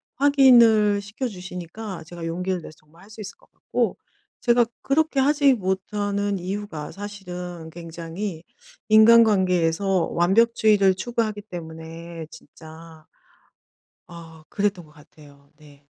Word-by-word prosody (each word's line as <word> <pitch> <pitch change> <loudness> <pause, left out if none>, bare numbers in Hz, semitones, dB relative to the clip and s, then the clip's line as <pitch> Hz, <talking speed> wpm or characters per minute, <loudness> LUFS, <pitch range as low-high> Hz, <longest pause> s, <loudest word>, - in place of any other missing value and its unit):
확인을 235 -7 +5
시켜 210 +6 -5
주시니까 180 -1 -8
제가 170 0 -8
용기를 180 +2 -3
내서 155 - -12
정말 165 +4 -22
할 205 - -17
수 215 0 -11
있을 205 - -9
것 - - -28
같고 - - -2 0.4
제가 240 -1 +4 0.2
그렇게 305 0 +1
하지 280 0 +4
못하는 200 0 -2
이유가 180 -5 -5
사실은 180 -5 -8
굉장히 170 +2 -7 0.5
인간관계에서 195 -5 +4
완벽주의를 210 +1 +3
추구하기 215 -1 -2
때문에 165 -2 -9
진짜 160 0 -14 1.0
아 165 -2 -13
그랬던 200 -4 -2
것 150 - -20
같아요. 145 -2 -19
네. 145 -2 -19
190 Hz, 275 characters per minute, -23 LUFS, 165-215 Hz, 1.0 s, 확인을